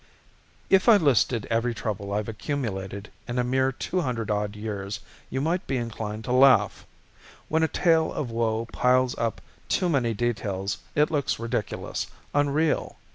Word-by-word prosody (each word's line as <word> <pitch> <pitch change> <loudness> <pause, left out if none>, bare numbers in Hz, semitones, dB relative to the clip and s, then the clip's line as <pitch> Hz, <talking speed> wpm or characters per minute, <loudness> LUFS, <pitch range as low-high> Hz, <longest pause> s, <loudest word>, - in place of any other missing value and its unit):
_ - - -30 0.6
If 190 +4 +4
I 220 - +9
listed 130 - +2
every 115 +1 +1
trouble 100 -3 -4
I've 105 +1 -1
accumulated 105 -5 -4 0.2
in 120 - -3
a 125 - +2
mere 130 +2 +2
two 180 +7 -2
hundred 115 -7 -2
odd 105 0 -1
years 100 -2 -4 0.3
you 130 - -2
might 170 +5 0
be 135 - 0
inclined 110 -2 -4
to 125 - -4
laugh. 125 -5 +5 0.6
When 160 +1 +2
a 160 - +4
tale 160 -1 +2
of 130 -6 -3
woe 115 0 0
piles 125 0 +3
up 115 -2 -1 0.3
too 180 - +2
many 125 -7 +1
details 100 -4 -2 0.2
it 150 +3 +3
looks 145 -4 0
ridiculous, 115 0 -3 0.3
unreal. 145 +2 +1
120 Hz, 160 wpm, -26 LUFS, 105-140 Hz, 0.6 s, I